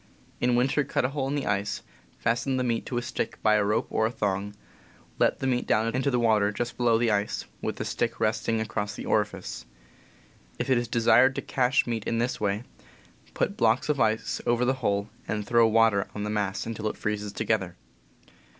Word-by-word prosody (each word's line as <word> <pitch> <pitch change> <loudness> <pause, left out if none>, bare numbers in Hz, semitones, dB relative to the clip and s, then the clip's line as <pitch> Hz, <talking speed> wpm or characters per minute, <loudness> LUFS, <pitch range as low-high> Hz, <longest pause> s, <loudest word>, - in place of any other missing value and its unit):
In 125 0 +2
winter, 135 +4 +2
cut 130 - 0
a - - +1
hole 135 -1 -2
in 140 - -1
the 145 - -2
ice, 100 0 -1 0.3
fasten 120 +3 0
the 130 - 0
meat 115 -2 -1
to 125 - -3
a 120 - -1
stick 120 - -4
by 110 - +5
a 105 -1 +3
rope 105 +2 +1
or 110 0 +2
thong, 100 -3 -2 0.6
let - - +3
the - - -4
meat 125 -2 0
down 115 +1 +2
into 130 +2 +1
the 125 -2 +1
water, 110 -3 +3
just 120 +3 -3
below 120 -2 +3
the 115 0 +2
ice, 105 0 -1 0.2
with - - -2
the - - -4
stick 115 -1 -2
resting 110 +1 0
across 105 -1 -3
the - - -7
orifice. 105 -1 -2 0.9
If 135 - -2
it 125 - +4
is 120 - -3
desired 120 +3 +4
to - - -3
cache 130 0 +2
meat 115 -3 -3
in 115 - -1
this 120 0 -1
way, 105 +2 0 0.7
put - - 0
blocks 115 +5 +2
of 145 -2 +1
ice 110 0 0
over 120 +1 +2
the 130 - +3
hole 100 -2 0 0.2
and 105 -1 -2
throw 115 0 +4
water 110 -3 +3
on 105 - -3
the 105 - -2
mass 100 -2 -1
until 110 -1 -3
it - - -3
freezes 105 -1 -3
together. 100 -5 -1
115 Hz, 205 wpm, -27 LUFS, 105-120 Hz, 0.9 s, by